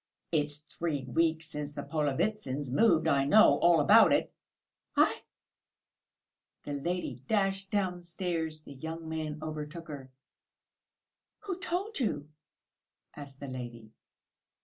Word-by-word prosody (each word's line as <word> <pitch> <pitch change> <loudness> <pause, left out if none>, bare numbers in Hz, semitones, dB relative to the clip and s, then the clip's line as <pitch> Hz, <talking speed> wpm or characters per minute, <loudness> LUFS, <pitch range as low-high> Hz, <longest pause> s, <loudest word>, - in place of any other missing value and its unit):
"It's 150 -2 +2
three 150 -1 -4
weeks 160 +5 +1
since 150 -1 -6
the - - -4
Polovitsyns 145 - -1
moved! 165 - +4
I 140 -1 +3
know 215 +10 +6
all 170 -1 +5
about 145 - +7
it!" - - +1 0.6
"Aïe!" - - +4 1.4
The 145 - -5
lady 145 -4 -3
dashed 195 -2 0
downstairs. 175 -4 -2
The 140 - -10
young 160 +4 -6
man 155 -1 -3
overtook 155 +2 -6
her. 135 -3 -8 1.3
"Who 380 -4 -4
told 385 +3 -2
you?" 150 - -1 0.9
asked 140 -2 -10
the 140 - -7
lady. 120 -4 -7
155 Hz, 115 wpm, -30 LUFS, 145-180 Hz, 1.4 s, about